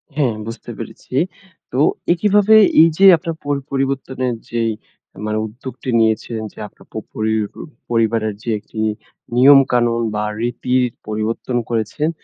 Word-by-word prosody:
হ্যাঁ, 135 -7 +1
বুঝতে 115 - -7
পেরেছি। - - -10 0.6
তো 125 - -1 0.3
একইভাবে 205 +3 +4 0.3
এইযে 165 +4 +4
আপনার 165 +1 -5
পর 145 0 0 0.2
পরিবর্তনের 135 -2 -1
যে 120 0 -1 0.6
মানে 110 0 -1
উদ্যোগটি 125 +3 -8
নিয়েছেন, 110 +1 0
যে - - -31
আপনার - - -20
প - - -18 0.2
পরি 110 0 -1 0.6
পরিবারের 115 -2 +1
যে 120 - -4
একটি 105 +1 -10 0.6
নিয়মকানুন 125 -3 +5
বা, 105 - -1 0.2
রীতির 125 +1 0 0.2
পরিবর্তন 110 +3 -2
করেছেন। 115 +7 -1
120 Hz, 125 wpm, -19 LUFS, 110-135 Hz, 0.6 s, নিয়মকানুন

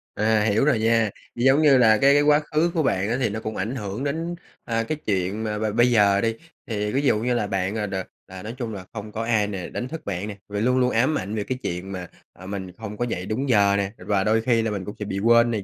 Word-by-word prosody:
À, 110 0 +2
hiểu 110 +5 +2
rồi 140 -7 +3
nha. 115 -1 +3 0.3
Giống 135 +5 +4
như 145 -4 +6
là 110 -3 +5
cái 140 +5 +5
cái 145 - +5
quá 145 0 +5
khứ 155 +3 0
của 160 - +1
bạn 100 -5 0
á, 120 - 0
thì 125 - +1
nó 105 +2 -4
cũng 110 0 -5
ảnh 110 +7 -3
hưởng 105 +1 -4
đến, 165 +4 -2 0.3
à, 115 -1 0
cái 155 +6 -3
chuyện 100 +1 -1
mà 105 -1 -2
b - - -6
bây 120 +1 +4
giờ 100 -3 +4
đi, 115 -1 0 0.3
thì 105 -2 -2
ví 135 - +1
dụ 135 -7 +2
như 125 +3 0
là 110 -4 0
bạn 95 +1 -1
à 105 - -1
đ 95 - -6 0.3
à, 95 0 -9
nói 110 +3 -6
chung 120 -4 -4
là 95 -3 -7
không 105 -1 -7
có 110 +2 -3
ai 110 -3 +2
nè, 95 -4 -5
đánh 125 - -4
thức 160 +3 -8
bạn 100 0 -3
nè, 105 -2 -7
và 100 0 -3
luôn 125 +3 +2
luôn 125 -1 +3
ám 130 +7 +2
ảnh 100 +3 -4
về 105 - -1
cái 130 +4 -3
chuyện 90 +3 -4
mà, 90 -2 -6 0.3
à, 90 - -13
mình 95 -1 -5
hông 105 -2 -7
có 120 - 0
dậy 90 -6 -4
đúng 125 +7 -2
giờ 100 -4 +4
nè, 100 -1 -1
và 100 -2 0
đôi 110 +2 +2
khi 115 0 +2
là 110 -1 -1
mình 100 -3 -4
cũng 105 - -7
sẽ 105 - -3
bị 100 -1 -3
quên 115 +2 +4
này 105 -3 -2
110 Hz, 290 wpm, -24 LUFS, 100-125 Hz, 0.3 s, như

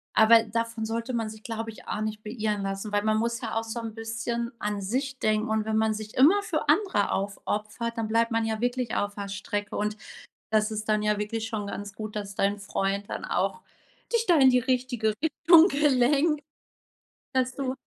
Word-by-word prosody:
Aber 225 +1 +7
davon 230 0 -2
sollte 230 +3 -3
man 225 -2 -1
sich, 215 0 -11
glaube 225 0 -4
ich, 220 - -15
auch 210 - -3
nicht 215 0 -4
beirren 210 -2 -2
lassen. 195 +2 -4
Weil 205 0 +1
man 215 0 +2
muss 235 +3 -1
ja 225 -3 -4
auch 225 - 0
so 225 +1 -5
'n 225 -1 -5
bisschen 230 +1 -3
an 210 -1 -2
sich 260 +6 -2
denken 215 0 +1
und 220 -1 0
wenn 220 0 0
man 220 0 +2
sich 215 0 -7
immer 330 +11 +6
für - - -2
andere 385 - +2
aufopfert, 210 +4 -3
dann 225 -1 -1
bleibt 230 +2 +2
man 225 0 +1
ja 220 -1 -2
wirklich 245 -1 -1
auf 205 0 -1
der 200 -1 -5
Strecke. 205 +1 -4
Und 210 +1 -1 0.5
das 215 0 +2
ist 215 0 -4
dann 215 -1 +2
ja 210 0 +1
wirklich 220 +2 -3
schon 215 -3 -3
ganz 200 0 -6
gut, 215 +1 -6
dass 200 -1 -4
dein 200 +1 +1
Freund 200 0 -2
dann - - -5
auch 460 - -1 0.5
dich 465 -1 +2
da 345 -4 +5
in 265 -2 +7
die 250 - +4
richtige 245 -3 0
Richtung 325 +2 +6
gelenkt 290 +1 +3 0.9
Dass 255 -1 +1
du, 265 -2 -2
220 Hz, 205 wpm, -27 LUFS, 210-245 Hz, 0.9 s, Aber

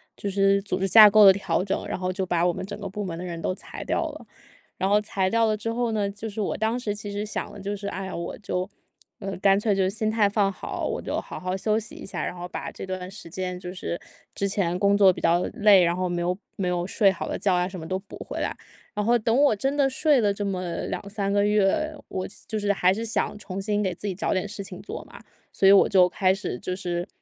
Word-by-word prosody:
就 200 - -4
是 195 0 +3
组 195 -2 -2
织 195 - +1
架 215 +2 +10
构 210 0 +7
的 190 - +10
调 190 -3 -1
整， 195 0 -2
然 - - -3
后 185 0 -2
就 190 0 -2
把 175 0 +1
我 175 - +1
们 190 - -5
整 205 - -7
个 200 - -5
部 205 +2 -5
门 170 -3 -5
的 180 - -5
人 170 -2 -5
都 185 - -1
裁 - - -8
掉 - - -1
了。 - - -10 0.5
然 190 - 0
后 210 +1 +4
裁 190 -3 -1
掉 230 +1 +3
了 215 - +1
之 225 +2 -3
后 240 0 0
呢 210 -2 0
就 210 +2 -6
是 205 - -7
我 205 - -1
当 225 +3 0
时 210 -4 -2
其 205 -1 -6
实 205 +1 -3
想 215 - -4
的 205 - -10
就 200 +1 -3
是： 200 0 -6
“哎 195 0 -5
呀， 190 - -6
我 170 0 -5
就 185 -1 -3 0.5
嗯， 195 -1 -5
干 195 0 +5
脆 205 -1 +1
就 190 -1 +2
心 215 +2 -1
态 210 -3 +3
放 200 -1 +2
好， - - -5
我 - - -3
就 - - -2
好 - - -8
好 185 +1 -2
休 210 +3 +1
息 220 - -8
一 - - -9
下。 - - -4
然 - - -3
后 175 0 -6
把 - - -6
这 - - -8
段 185 -1 -5
时 195 - -9
间 180 +1 -4
就 180 -1 -7
是 175 -2 -4 0.4
之 200 - 0
前 185 -3 0
工 200 0 +4
作 195 -2 +7
比 - - -7
较 170 +2 +3
累， 205 -3 +6
然 170 0 +2
后 185 - 0
没 175 -1 -2
有 180 +1 0 0.2
没 190 - -2
有 175 -1 0
睡 195 +1 +3
好 - - -5
的 - - -3
觉 195 - +1
啊 180 0 +1
什 185 0 -7
么 160 - -7
都 185 +1 -2
补 195 +1 -12
回 - - -6
来。” - - -2 0.4
然 210 - -1
后 235 +2 +4
等 230 0 +1
我 275 -7 +4
真 270 +7 -1
的 280 -2 +4
睡 280 0 +3
了 205 -2 +2
这 205 +1 -4
么 185 -3 -3
2-3 200 0 -3
个 205 0 +3
月， 210 +10 +2
我 185 - -3
西 205 - -12
就 220 - -2
是 205 -1 +1
还 185 -2 +3
是 225 - -4
想 225 - -1
重 195 -2 -6
新 210 +1 0
给 185 -3 0
自 205 - -5
己 195 - -1
找 - - -1
点 185 +2 -1
事 200 - -6
情 190 -1 -9
做 195 - -7
嘛， - - -13 0.3
所 195 - +3
以 - - +9
我 200 - +7
就 185 -3 +5
开 185 +1 +2
始 190 -10 -4
就 185 - -3
是 175 -1 -3
195 Hz, 300 characters per minute, -25 LUFS, 185-210 Hz, 0.5 s, 架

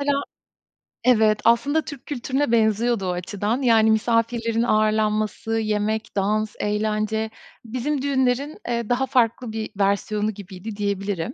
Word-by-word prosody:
mesela 280 0 +1 0.8
Evet 220 -4 +4
aslında 280 +7 +3
Türk 285 -3 -9
kültürüne 275 -1 -1
benziyordu 225 -1 +2
o 180 - 0
açıdan. 205 +7 -2
Yani, 225 -3 +4
misafirlerin 230 +1 +1
ağırlanması, 215 0 +1
yemek, 215 0 -1
dans, 210 +2 0
eğlence 215 +1 -1 0.4
bizim 255 +5 -2
düğünlerin, 270 +1 0
eee, 235 -2 -2
daha 250 +2 +2
farklı 245 -2 +1
bir 220 0 -4
versiyonu 205 +2 +1
gibiydi 195 +2 -8
diyebilirim. 200 +1 -2
220 Hz, 120 wpm, -23 LUFS, 210-245 Hz, 0.8 s, Evet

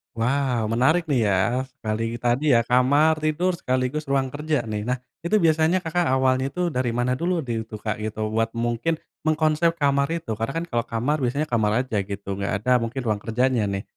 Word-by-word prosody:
Wow, 125 -1 0
menarik 155 +9 +2
nih 125 -6 +2
ya. 105 +6 +1
Sekali 115 -2 -4
tadi 125 +4 +2
ya, 115 - +5
kamar 140 +6 +3
tidur, 165 +4 0
sekaligus 130 +3 -1
ruang 135 -1 0
kerja 150 0 -1
nih. 105 -2 -4
Nah, 125 0 -2 0.2
itu 210 +4 +2
biasanya, 160 +3 +3
Kakak 175 +1 0
awalnya 130 +1 +1
tuh 180 -1 0
dari 125 -5 -1
mana 125 +2 0
dulu 175 0 0
di 115 -4 -3
tuh, 110 -1 -9
Kak, 110 0 -2
gitu, 110 0 -3
buat 115 +1 -1
mungkin 120 +7 -1 0.3
mengkonsep 155 +1 +2
kamar 140 -3 +2
itu, 115 -10 -4
karena 115 +5 -2
kan - - -4
kalau 120 -1 -1
kamar 125 +7 -1
biasanya 140 +3 -1
kamar 110 0 +2
aja 130 -5 -3
gitu, 100 0 -5
enggak 100 0 -2
ada 125 +2 +3
mungkin 115 +3 -3
ruang 110 -4 0
kerjanya 120 +1 0
nih. 100 0 -3
125 Hz, 195 wpm, -24 LUFS, 115-150 Hz, 0.3 s, ya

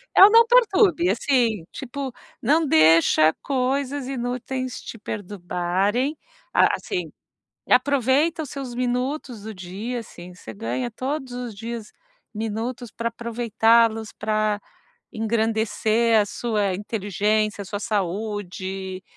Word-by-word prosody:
é - - +9
o 400 - +11
não 460 +1 +7
perturbe, 405 -7 +4
assim, 235 - +1
tipo 270 -1 -6 0.3
não 310 +1 +3
deixa 160 -2 +5
coisas 270 0 -1
inúteis 255 0 -3
te 230 - -9
perturbarem. 200 - -1 0.4
A - - +6
assim, 370 -3 -4 0.6
aproveita 280 +5 +3
os 285 - -8
seus 270 -3 -6
minutos 250 -1 -2
do 220 - -6
dia, 200 +7 -5
assim, 180 -5 -11
você 180 - -10
ganha 240 +4 -3
todos 265 +2 -4
os 245 -2 -5
dias, 230 0 -6 0.4
minutos 225 +3 -4
para 235 0 -2
aproveitá-los 230 -1 +2
pra 215 -1 0 0.5
engrandecer 220 0 +1
a 205 - +1
sua 205 -4 -1
inteligência, 210 +1 -1
a - - -9
sua 205 +2 -5
saúde, 190 -2 -3
230 Hz, 115 wpm, -23 LUFS, 205-255 Hz, 0.6 s, o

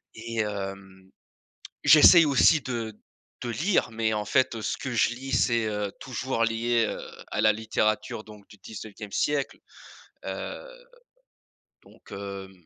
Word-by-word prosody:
et 115 +1 -7
hem, 95 -2 -6 0.8
j'essaye 165 +2 +8
aussi 150 +2 +4
de 115 -4 -4 0.5
de 120 - -3
lire, 165 - +1
mais 110 -1 0
en 105 - -2
fait, 130 -2 +1
ce - - -2
que 130 - -5
je 115 - +3
lis 130 +3 -7
c'est, 115 -3 +2
heu, 105 -2 -3
toujours 125 -1 -3
lié, 115 0 +1
heu, - - -4 0.3
à - - -1
la 110 - +5
littérature, 110 0 -1
donc 105 -2 -15
du - - -15
19e 105 0 -10
siècle, 145 -2 -1 0.7
heu, - - -6 1.2
donc, - - -20
hem, 100 -1 -7
110 Hz, 140 wpm, -26 LUFS, 105-120 Hz, 1.2 s, j'essaye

